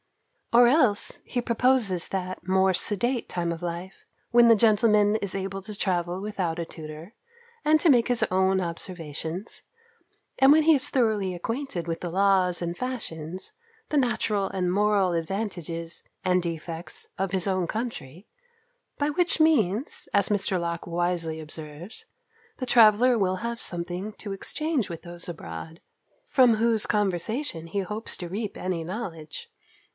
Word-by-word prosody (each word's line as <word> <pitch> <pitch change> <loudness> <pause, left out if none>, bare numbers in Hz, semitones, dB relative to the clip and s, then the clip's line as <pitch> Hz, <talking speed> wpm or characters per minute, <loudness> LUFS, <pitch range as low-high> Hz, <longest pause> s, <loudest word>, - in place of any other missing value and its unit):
Or 240 +1 +7
else 245 -6 +3
he 245 - -2
proposes 235 -6 +2
that 185 -2 -4
more 190 0 +3
sedate 235 +7 +1
time 170 -1 -2
of 165 - -9
life, 175 +2 -6 0.3
when 240 0 +7
the 230 - +8
gentleman 210 -1 +4
is 200 -3 -2
able 195 0 -4
to 210 +2 -7
travel 180 -2 -1
without 190 -5 -3
a 170 - -2
tutor, 160 +4 -10 0.5
and 310 +1 +4
to 340 - +4
make 240 -4 +5
his 245 -2 +2
own 190 +1 +3
observations; 170 +1 -5 0.8
and 270 +1 +7
when 310 +1 +6
he 320 +1 +6
is 275 - +2
thoroughly 215 -7 +1
acquainted 225 - -4
with 165 -1 -3
the 175 - -3
laws 185 -1 +2
and 170 0 -3
fashions, 185 - -5 0.4
the - - -2
natural 225 -7 +1
and 180 -2 -1
moral 200 -2 +2
advantages 170 -2 -3 0.2
and 180 0 +3
defects 165 0 -5
of 195 -1 -1
his 190 0 0
own 185 -2 +1
country; 210 - -5 0.7
by 290 0 0
which 345 +2 +1
means, 255 - +2
as 200 -1 +3
Mr. 195 -3 0
Locke 170 0 -4
wisely 170 -2 -1
observes, 155 +5 -9 0.5
the 255 - -3
traveller 235 +1 +5
will 185 -3 +1
have 235 +3 -4
something 175 +4 -3
to 205 -1 -7
exchange 300 - -1
with 170 -2 -7
those 175 0 -6
abroad, 160 - -8 0.5
from 250 - +5
whose 225 -1 +2
conversation 200 - -1
he 200 +4 -2
hopes 210 +4 -4
to 175 - -6
reap 205 +4 -4
any 180 -3 -2
knowledge. 165 -5 -6
190 Hz, 150 wpm, -26 LUFS, 175-230 Hz, 0.8 s, the